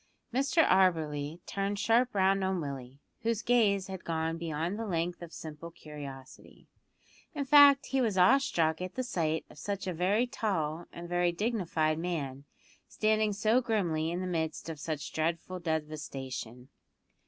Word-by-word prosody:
Mr 280 +5 +3
Auberly 160 -4 +2
turned 200 +1 -2
sharp 235 +3 +2
round 195 0 +3
on 190 -1 0
Willie, 135 -3 -6 0.2
whose 230 -1 -1
gaze 210 -6 +3
had 190 -1 -7
gone 160 0 -1
beyond 165 +4 -3
the 225 - -3
length 175 -1 -2
of 170 -1 -8
simple 160 +1 -8
curiosity. 145 -5 -11 0.7
In 285 -2 -2
fact, 285 0 +7
he 270 -1 0
was 215 -6 0
awe 240 +10 +6
struck 165 -12 0
at 185 0 -5
the 255 - -1
sight 160 -9 -1
of - - -15
such 200 -1 -3
a 185 - -2
very 195 +8 +2
tall 170 -9 -2
and 170 0 -8
very 175 0 +1
dignified 170 -6 0
man 145 -6 -3 0.4
standing 215 0 +1
so 215 +5 +2
grimly 175 -10 0
in 175 +2 -2
the - - -3
midst 165 -2 -2
of 160 -2 -6
such 150 -1 -4
dreadful 170 +3 -2
devastation. 140 -6 -4
175 Hz, 155 wpm, -30 LUFS, 155-210 Hz, 0.7 s, fact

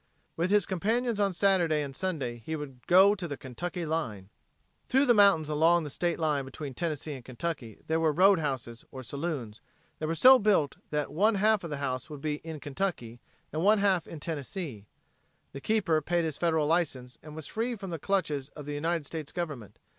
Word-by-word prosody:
With 170 +3 0
his 205 -2 +4
companions 220 +5 0
on 200 -1 +2
Saturday 175 -5 +2
and 135 -2 -7
Sunday 155 -10 -3
he 160 - -3
would 140 -4 -7
"go 190 +3 +7
to 190 -4 -4
the 145 -3 -5
Kentucky 170 +7 -5
line." 120 -12 -3 0.6
Through 270 +2 +4
the 245 - +5
mountains 200 -8 +5
along 165 +3 +3
the 150 - -6
state 175 +3 -1
line 150 -4 0
between 135 +1 -7
Tennessee 155 0 -3
and 130 -3 -9
Kentucky 130 -3 -5
there 160 +1 0
were 160 -1 +3
road 190 +4 +5
houses, 130 -6 -4
or 130 -1 -8
saloons, 140 -5 -5 0.4
that 155 - -2
were 165 - -1
so 255 +8 +8
built 200 - +2
that 150 -1 -2
one 210 +7 +3
half 210 0 +3
of 170 - -5
the 150 - -3
house 130 -1 -3
would 150 -2 -7
be 150 0 -1
in 160 0 -8
Kentucky 135 -6 -3 0.3
and 155 - -1
one 210 +2 +5
half 195 -4 +2
in 160 - -8
Tennessee. 145 - -5 0.6
The 140 - -8
keeper 190 -7 +1
paid 170 +2 0
his 155 -3 -2
federal 160 -2 +1
license 145 -6 -1
and 155 0 -11
was 160 -2 -7
free 235 +2 -2
from 195 -4 -7
the 165 - -4
clutches 150 -7 -1
of 150 - -8
the 145 - -4
United 165 +1 -1
States 155 -1 -5
Government. 150 - -5
160 Hz, 200 wpm, -29 LUFS, 140-185 Hz, 0.6 s, so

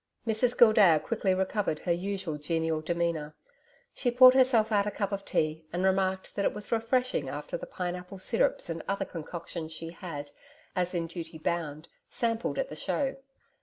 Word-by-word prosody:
Mrs 230 +2 +1
Gildea 210 -9 +7
quickly 195 +2 0
recovered 190 -3 0
her 175 - -1
usual 180 -3 -2
genial 160 0 -1
demeanour. 165 -2 -2 0.6
She 250 - 0
poured 255 +1 +8
herself 250 -4 +4
out 205 -1 +3
a - - +2
cup 200 -1 -2
of 200 0 -3
tea, 155 +1 0
and 175 +2 -2
remarked 190 0 +1
that 200 - -1
it - - +1
was 210 - -3
refreshing 240 +3 +1
after - - -5
the - - -5
pine 180 - -3
apple 180 +2 -9
syrups 225 +5 +1
and 165 -1 -4
other 195 0 -1
concoctions 165 -1 -6
she 165 +1 -5
had, 155 -5 -7 0.4
as 180 0 0
in 170 -1 0
duty 165 -1 -7
bound, 155 -1 -3 0.2
sampled 230 -1 -1
at - - -1
the - - -7
Show. 270 -2 -1
185 Hz, 175 wpm, -29 LUFS, 165-220 Hz, 0.6 s, poured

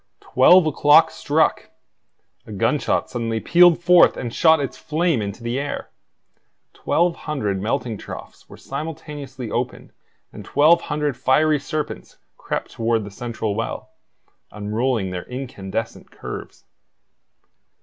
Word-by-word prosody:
Twelve 175 +7 +5
o'clock 155 +1 +5
struck! 155 +2 0 0.8
A - - -9
gunshot 120 +9 0
suddenly 115 -2 -2
pealed 175 +4 +5
forth 180 0 +6
and 120 -2 -5
shot 160 -1 +4
its 140 -2 -3
flame 160 -4 0
into 100 +3 -6
the 120 +3 -2
air. 145 0 -5 0.8
Twelve 170 0 0
hundred 105 -11 -3
melting 110 +1 -2
troughs - - -10
were - - -12
simultaneously 145 -5 -7
opened - - -4 0.4
and - - -9
twelve 160 +4 +4
hundred 150 -4 -1
fiery 150 +3 +2
serpents 150 +1 -5 0.2
crept - - -5
toward 115 -1 0
the 100 - -9
central 110 -1 -4
well, 115 +2 -5 0.6
unrolling 105 0 -2
their 90 -1 -5
incandescent 115 -5 -6
curves. - - -9
130 Hz, 120 wpm, -21 LUFS, 115-155 Hz, 0.8 s, forth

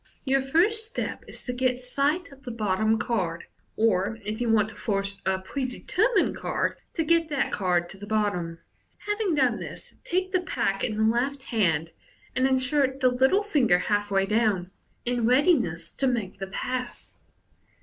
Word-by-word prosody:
Your 270 0 +3
first 355 +12 +3
step 445 - -4
is - - -8
to 250 - -3
get 250 0 0
sight 280 +7 0
of 275 0 -15
the 270 - -7
bottom 220 -1 +1
card, 190 -7 -1 0.3
or, 215 0 +2
if 215 +3 -3
you 240 - 0
want 215 -1 +3
to 215 - -12
force 195 -1 -2
a 190 0 +2
prede 250 +7 -5
termined 440 -7 +2
card, - - -2 0.2
to 325 - +1
get 330 0 +2
that 285 -2 0
card 180 -3 +1
to 195 - -10
the 205 - -8
bottom. 200 -6 -1 0.5
Having 415 -4 0
done 260 -4 +3
this, - - -8
take 370 +1 -1
the 370 -1 +2
pack 230 - -1
in 220 - -1
the 215 - +1
left 255 +5 +1
hand, 165 - 0 0.4
and 260 +1 +3
insert 265 +1 +1
the 255 -2 +4
little 265 +11 +3
finger 275 - +3
half 205 +2 0
way 195 -1 +2
down, 205 -4 +1 0.3
in 240 -2 +1
readiness 245 - +2
to 270 - -1
make 220 -7 -2
the 195 - -4
pass. 250 +5 -5
240 Hz, 175 wpm, -26 LUFS, 200-275 Hz, 0.5 s, the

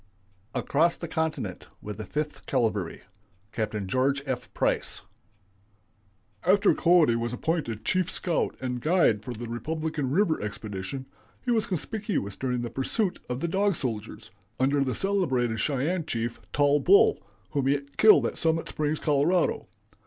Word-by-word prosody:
ACROSS 165 +4 +2
THE 170 - -5
CONTINENT 160 -1 -3
WITH 105 0 -7
THE 110 -3 -6
FIFTH 150 0 -4
CAVALRY. 110 -9 -1 0.5
(Capt. 110 -2 -2
George 135 +6 +1
F. 130 -3 -4
Price.) - - -1 1.4
"After 200 +3 +4
Cody 170 -8 +4
was 115 +1 -2
appointed 125 -7 -2
chief 185 -1 +1
scout 175 -2 -1
and 125 -1 -3
guide 155 - +3
for 125 - -6
the 120 0 -6
Republican 155 +3 -3
River 165 +2 +2
expedition, 105 +4 -5 0.4
he 245 - +1
was 225 -2 +2
conspicuous 190 - -2
during 125 +1 -2
the 120 - -4
pursuit 180 - -1
of 125 +2 -3
the 170 - 0
Dog 195 +2 +1
Soldiers, 115 -8 -5 0.3
under 140 +2 +3
the 130 -2 -2
celebrated 130 - 0
Cheyenne 150 +7 0
chief, 115 -3 -3
Tall 145 0 +3
Bull, 190 +8 +5 0.3
whom 140 -2 0
he 140 +1 +2 0.2
killed 215 -1 +7
at - - -3
Summit 165 0 +1
Springs, 155 0 -1
Colo. 155 +4 +1
140 Hz, 145 wpm, -27 LUFS, 120-170 Hz, 1.4 s, killed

